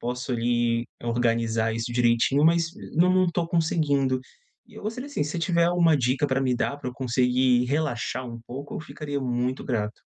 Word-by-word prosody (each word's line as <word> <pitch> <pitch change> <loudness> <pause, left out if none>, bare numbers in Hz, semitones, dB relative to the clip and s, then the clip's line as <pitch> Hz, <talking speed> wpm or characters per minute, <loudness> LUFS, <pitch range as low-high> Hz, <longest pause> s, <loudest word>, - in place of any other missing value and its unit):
posso 125 +2 -3
ali 120 0 +1 0.2
organizar 115 -1 0
isso 115 +2 -3
direitinho, 120 +4 +3
mas 165 0 +3 0.3
não 180 +3 +5
não 185 0 +4
tô 170 0 -1
conseguindo. 150 -6 +1 0.5
E - - -19
eu - - -10
gostaria 230 +6 -4
assim, 285 - -2
se 150 - -4
você - - -3
tiver 170 0 +2
alguma 170 -2 +4
dica 130 +2 +1
pra 135 -1 0
me 130 -2 +1
dar, 140 - -1
pra 125 - -5
eu - - -15
conseguir 125 -1 +2
relaxar 130 -3 -2
um 115 -1 -8
pouco, 140 +4 -7
eu - - -4
ficaria 145 -2 -5
muito 125 +1 -1
grato. 110 -5 -3
130 Hz, 190 wpm, -25 LUFS, 120-155 Hz, 0.5 s, não